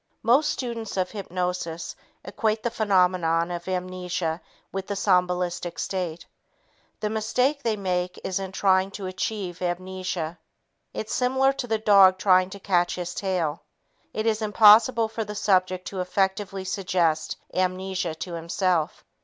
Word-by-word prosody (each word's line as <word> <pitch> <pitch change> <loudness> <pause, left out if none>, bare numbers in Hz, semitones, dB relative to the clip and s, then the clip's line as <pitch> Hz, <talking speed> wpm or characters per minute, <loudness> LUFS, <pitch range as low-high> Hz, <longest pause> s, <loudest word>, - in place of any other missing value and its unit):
Most 265 +7 +4
students 230 -5 -4
of 185 -1 0
hypnosis 180 -4 -4 0.3
equate 215 +2 -1
the 235 - -1
phenomenon 180 -6 +2
of 175 0 -5
amnesia 180 -2 -3 0.3
with 195 0 -4
the 205 - -2
somnambulistic 180 -2 0
state. 175 -3 -3 0.8
The 210 - 0
mistake 250 +6 0
they 230 -5 0
make 180 -2 -2
is 190 0 -2
in 190 -1 -5
trying 190 0 +2
to 200 - -6
achieve 185 -1 -4
amnesia. 180 -2 -3 0.5
It's 215 - -5
similar 265 +2 +2
to 260 -2 -5
the 220 -1 +1
dog 200 -3 +6
trying 185 -1 +4
to 200 +1 -9
catch 175 -3 +1
his 180 0 -4
tail. 175 -6 -1 0.5
It 215 - -3
is 220 -1 +1
impossible 220 +2 +6
for 225 0 -4
the 210 0 -7
subject 185 -2 +1
to 190 -2 -4
effectively 190 +1 -1
suggest 180 -4 0 0.2
amnesia 185 -2 -1
to 165 +2 -6
himself. 170 0 -1
185 Hz, 140 wpm, -25 LUFS, 180-210 Hz, 0.8 s, dog